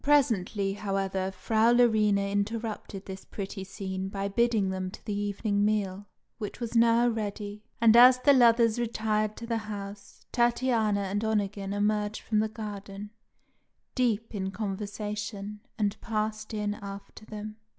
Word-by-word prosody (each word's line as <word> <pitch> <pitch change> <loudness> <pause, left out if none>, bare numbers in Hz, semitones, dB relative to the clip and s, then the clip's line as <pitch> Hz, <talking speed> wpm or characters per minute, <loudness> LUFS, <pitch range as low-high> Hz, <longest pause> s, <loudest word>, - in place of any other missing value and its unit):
Presently, 220 -9 +2
however, 195 -2 -1
Frau 220 +4 +2
Larina 210 -4 +3
interrupted 210 -1 -3
this 190 0 -8
pretty 195 -1 -6
scene 190 -1 -5
by 195 0 -3
bidding 220 -3 +2
them 185 0 -3
to - - -12
the 210 - -2
evening 205 0 0
meal, 205 -2 0 0.3
which 210 -2 -5
was 235 -1 -4
now 235 +1 +5
ready; 210 -2 -3 0.2
and 230 -1 +6
as 250 +1 +9
the 280 +3 +5
lovers 235 -2 +5
retired 215 -2 0
to 235 - -6
the 230 -1 -1
house, 200 -1 -8
Tatiana 235 -4 +2
and 200 +2 -2
Onegin 205 -2 -1
emerged 210 +1 0
from 215 - +1
the 215 0 +1
garden, 205 -1 -7 0.8
deep 230 -4 0
in 190 -2 -2
conversation, 210 +1 -4 0.2
and 210 -1 -1
passed 215 -1 -2
in 210 -1 -1
after 200 +1 -9
them. 215 0 -7
210 Hz, 140 wpm, -28 LUFS, 200-225 Hz, 0.8 s, as